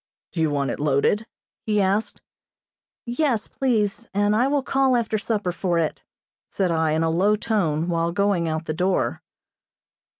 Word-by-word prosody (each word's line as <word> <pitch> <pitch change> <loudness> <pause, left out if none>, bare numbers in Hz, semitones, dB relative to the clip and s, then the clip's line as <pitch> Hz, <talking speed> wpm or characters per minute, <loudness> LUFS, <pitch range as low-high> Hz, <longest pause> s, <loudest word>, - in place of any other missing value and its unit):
"Do 170 - -5
you 160 - +2
want 140 -2 -1
it - - -5
loaded?" 150 - +1 0.4
he 210 -1 +1
asked. 200 +3 0 0.8
"Yes, 240 -2 0
please, 230 -4 -1
and 205 +1 +2
I 245 +4 +3
will 280 -1 +1
call 270 -1 +2
after 220 -2 -1
supper 205 -3 -1
for 175 -1 -1
it," 160 -2 -1 0.5
said 185 -3 0
I, 160 -1 +1
in 160 +1 +1
a 165 - +1
low 195 +6 +3
tone, 180 -8 0
while 170 -1 0
going 185 -3 +1
out 160 +1 -3
the 155 - -2
door. 185 +3 0
195 Hz, 165 wpm, -23 LUFS, 165-220 Hz, 0.8 s, I